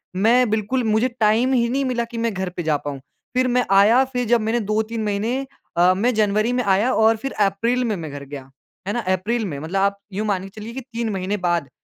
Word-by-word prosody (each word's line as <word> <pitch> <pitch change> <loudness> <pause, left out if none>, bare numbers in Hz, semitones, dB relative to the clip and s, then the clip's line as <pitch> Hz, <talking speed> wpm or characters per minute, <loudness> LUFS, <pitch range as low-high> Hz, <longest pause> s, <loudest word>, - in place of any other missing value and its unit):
मैं 230 +5 +3
बिल्कुल 220 +4 0
मुझे 220 +2 +2
टाइम 225 +5 +3
ही 235 -2 +2
नहीं 270 +3 0
मिला 245 -2 0
कि 235 0 -9
मैं 230 -1 0
घर 190 -1 -3
पे 175 - -2
जा 155 -2 +1
पाऊँ। 145 -1 -6 0.4
फिर 255 0 +3
मैं 250 -1 +2
आया, 210 +6 +6
फिर 250 -2 -3
जब 235 0 +3
मैंने 225 +2 0
2 215 0 0
3 225 0 -4
महीने 220 +6 -1 0.3
अ, 180 +1 +5
मैं 230 +7 +1
जनवरी 215 +2 +2
में 250 0 0
आया 200 +4 +2
और 220 +1 +4
फिर 270 +5 -5 0.2
अप्रैल 230 +6 0
में 220 -3 0
मैं 160 -5 -6
घर 145 0 -7
गया, 135 -1 -9 0.4
है 205 - -1
ना? 240 - -1
अप्रैल 210 +4 -1
में, 155 -7 -4
मतलब 170 +6 -2
आप 200 0 +1 0.2
यूँ 210 +3 -2
मान 190 -3 0
के 195 - -8
चलिए 230 +2 -7
कि 265 - -5
3 235 -2 -4
महीने 195 +2 -2
बाद 170 -5 0
215 Hz, 245 wpm, -21 LUFS, 195-240 Hz, 0.4 s, आया